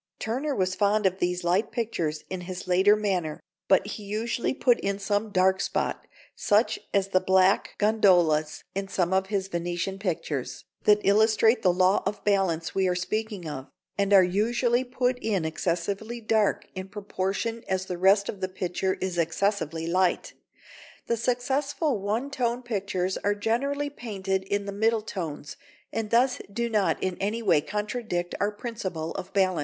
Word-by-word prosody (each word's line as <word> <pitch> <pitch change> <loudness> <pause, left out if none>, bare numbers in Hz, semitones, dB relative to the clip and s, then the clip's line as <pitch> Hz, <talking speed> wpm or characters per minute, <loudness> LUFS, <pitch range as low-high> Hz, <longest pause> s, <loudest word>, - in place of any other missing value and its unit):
Turner 265 +6 -2
was 185 -1 0
fond 205 +1 +2
of 190 0 +1
these 180 0 -1
light 180 +5 +1
pictures 170 -10 -2
in 185 -1 -5
his 180 +1 -7
later 190 +3 +5
manner, 185 -7 -1 0.3
but 190 0 +4
he 210 +1 -6
usually 220 +4 -2
put 245 -3 +3
in 200 0 -1
some 205 +2 -1
dark 190 -1 +3
spot, - - -2 0.3
such 210 +3 +2
as 195 -1 +1
the 185 - +3
black 190 +1 +3
gondolas 175 -8 +3
in 195 0 -3
some 180 -1 0
of 190 0 +2
his 195 -2 -1
Venetian 175 +2 -3
pictures, 160 -8 -3 0.2
that 210 0 +5
illustrate 220 +3 +4
the 185 - +4
law 185 +2 +3
of 210 - -4
balance 190 -5 +1
we 190 -1 +2
are 180 - +1
speaking 205 0 -3
of, 135 -2 -6 0.3
and 200 0 0
are 195 -2 +8
usually 235 +6 +1
put 250 0 -1
in 200 -8 -1
excessively 190 +8 -2
dark 220 -2 +1
in 185 0 -6
proportion 205 +3 -3
as 190 0 -1
the 180 - -4
rest 200 +2 +4
of 195 - -5
the 185 - -1
picture 185 0 -2
is 185 -2 -3
excessively 165 -1 0
light. 180 +2 +1 0.7
The 235 - +1
successful 265 +3 0
one 225 +8 -2
tone 245 -2 -1
pictures 195 -5 -2
are 205 0 0
generally 280 +7 -1
painted 195 -7 -3
in 200 +1 -1
the 200 - -4
middle 220 +2 +1
tones, 160 -8 -6 0.4
and 220 -2 -2
thus 250 +3 +3
do 235 +3 -2
not 210 -3 +2
in 185 -1 -1
any 215 +4 -2
way 180 -8 +4
contradict 210 -1 -3
our 205 - +2
principle 195 -7 -5
of 190 - -6
balance. 185 -3 +2
200 Hz, 165 wpm, -26 LUFS, 185-220 Hz, 0.7 s, are